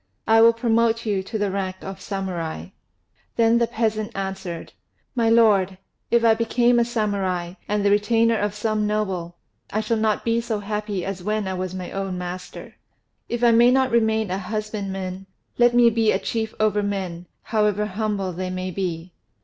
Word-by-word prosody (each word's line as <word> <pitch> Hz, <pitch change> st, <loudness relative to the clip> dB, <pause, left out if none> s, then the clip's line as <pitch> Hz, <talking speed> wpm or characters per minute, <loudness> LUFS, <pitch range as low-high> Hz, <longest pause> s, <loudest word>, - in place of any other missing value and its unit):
I 225 Hz, 0 st, +6 dB
will 230 Hz, 0 st, +7 dB
promote 230 Hz, 0 st, +1 dB
you 205 Hz, -3 st, 0 dB
to 220 Hz, +4 st, -5 dB
the 205 Hz, -2 st, 0 dB
rank 190 Hz, -1 st, -2 dB
of 195 Hz, 0 st, -8 dB
Samurai." 175 Hz, -, -4 dB, 0.7 s
Then 230 Hz, 0 st, +4 dB
the 235 Hz, -, +2 dB
peasant 215 Hz, -2 st, -1 dB
answered, 190 Hz, -3 st, -5 dB, 0.4 s
"My 230 Hz, -3 st, +2 dB
lord, 205 Hz, -5 st, +4 dB, 0.3 s
if 235 Hz, 0 st, +3 dB
I 225 Hz, -, +7 dB
become 235 Hz, +2 st, +2 dB
a 235 Hz, -, +3 dB
Samurai, 195 Hz, -6 st, -1 dB
and 205 Hz, -1 st, 0 dB
the 200 Hz, -, +4 dB
retainer 225 Hz, +2 st, +3 dB
of 205 Hz, -1 st, -1 dB
some 215 Hz, 0 st, 0 dB
noble, 190 Hz, -5 st, -2 dB, 0.4 s
I 215 Hz, -, 0 dB
shall 225 Hz, +1 st, 0 dB
not 215 Hz, -1 st, 0 dB
be 230 Hz, 0 st, +2 dB
so 230 Hz, -2 st, -2 dB
happy 205 Hz, -2 st, -3 dB
as 195 Hz, -1 st, -4 dB
when 210 Hz, +1 st, -1 dB
I 190 Hz, -, -2 dB
was 185 Hz, 0 st, -4 dB
my 180 Hz, -1 st, -6 dB
own 195 Hz, -2 st, -3 dB
master. 180 Hz, 0 st, -7 dB, 0.5 s
If 240 Hz, 0 st, -2 dB
I 240 Hz, -, +6 dB
may 235 Hz, +1 st, +6 dB
not 260 Hz, 0 st, +3 dB
remain 220 Hz, -3 st, +2 dB
a 190 Hz, -, -1 dB
husbandman, 195 Hz, -2 st, -4 dB, 0.3 s
let 240 Hz, 0 st, +5 dB
me 240 Hz, -1 st, +6 dB
be 225 Hz, -1 st, +2 dB
a -, -, +2 dB
chief 220 Hz, +3 st, -3 dB
over 210 Hz, -1 st, +2 dB
men, 185 Hz, -4 st, -4 dB, 0.2 s
however 210 Hz, -2 st, +1 dB
humble 205 Hz, -2 st, -2 dB
they 185 Hz, +2 st, -4 dB
may 185 Hz, 0 st, -4 dB
be." 175 Hz, -2 st, -4 dB
210 Hz, 180 wpm, -23 LUFS, 190-225 Hz, 0.7 s, will